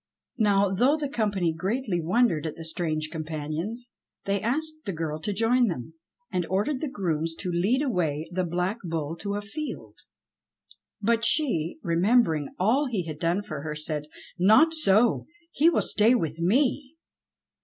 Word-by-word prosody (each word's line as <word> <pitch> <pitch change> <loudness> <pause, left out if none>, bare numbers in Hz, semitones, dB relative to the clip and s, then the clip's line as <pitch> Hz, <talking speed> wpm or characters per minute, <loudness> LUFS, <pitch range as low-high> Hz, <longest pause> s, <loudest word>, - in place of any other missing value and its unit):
Now, 200 -2 +3
though 255 +10 +3
the 300 -2 -2
company 205 - 0
greatly 190 +2 -2
wondered 175 -3 +2
at 155 - -5
the 165 - -8
strange 155 -2 -2
companions, 160 +9 -5 0.3
they 200 0 0
asked 310 +6 -1
the 195 - -3
girl 160 -2 -3
to 185 +6 -3
join 230 +4 +2
them, 160 - -5 0.4
and 180 -2 0
ordered 210 - -1
the 305 - -2
grooms 165 -7 -2
to 180 +1 -4
lead 200 +11 +1
away 165 - -1
the 185 +1 -1
Black 180 +5 -2
Bull 165 -2 -3
to 200 +4 -4
a 205 - -3
field. 295 +9 -7 1.0
But 230 +2 +2
she, 225 - +1
remembering 170 - +2
all 245 +10 +2
he 215 -8 -2
had 155 -2 -6
done 170 +5 0
for 155 -7 -6
her 150 0 -5
said, 150 -1 -4 0.3
"Not 220 - +6
so! 235 -7 +3 0.2
He 320 +3 +4
will 345 - +1
stay 220 +4 +4
with 165 -8 -2
me!" 265 - +1
195 Hz, 160 wpm, -26 LUFS, 165-240 Hz, 1.0 s, Not